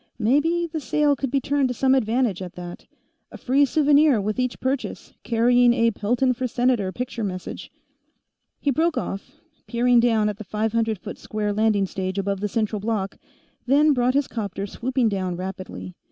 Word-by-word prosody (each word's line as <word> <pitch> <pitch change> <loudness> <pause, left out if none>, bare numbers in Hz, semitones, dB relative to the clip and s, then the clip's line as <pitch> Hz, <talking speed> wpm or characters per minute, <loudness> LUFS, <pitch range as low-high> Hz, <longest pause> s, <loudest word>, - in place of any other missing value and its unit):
Maybe 295 +9 +2
the 325 -1 -4
sale 295 +1 +2
could 270 0 -3
be 275 +2 +1
turned 280 +1 +1
to 250 - -3
some 265 +2 +3
advantage, 235 -5 +1
at 180 -2 -7
that. 175 -1 -9 0.4
A - - -9
free 275 +3 +3
souvenir 290 -2 +4
with 210 +3 -2
each 250 -1 -1
purchase, 260 +1 -3
carrying 240 +1 +4
a 230 -1 +3
Pelton 245 +5 +1
for 255 +1 -2
Senator 240 -5 +1
picture 245 +1 -4
message 185 -3 -6 0.9
He 285 - +1
broke 320 +4 +1
off, 225 +8 -5 0.3
peering 240 0 +3
down 225 -3 +3
at 210 -1 -3
the - - -6
five 215 +2 -2
hundred 225 -2 +1
foot - - -9
square 210 -1 -3
landing 210 -2 +2
stage 190 0 -4
above 195 0 -1
the 210 - -1
central 215 0 -1
block, 205 -2 -3 0.5
then 295 +3 +5
brought 250 0 +1
his 285 -1 +2
'copter 200 -3 -4
swooping 250 +4 -1
down 190 -4 -2
rapidly. 185 0 -7
235 Hz, 180 wpm, -23 LUFS, 205-260 Hz, 0.9 s, then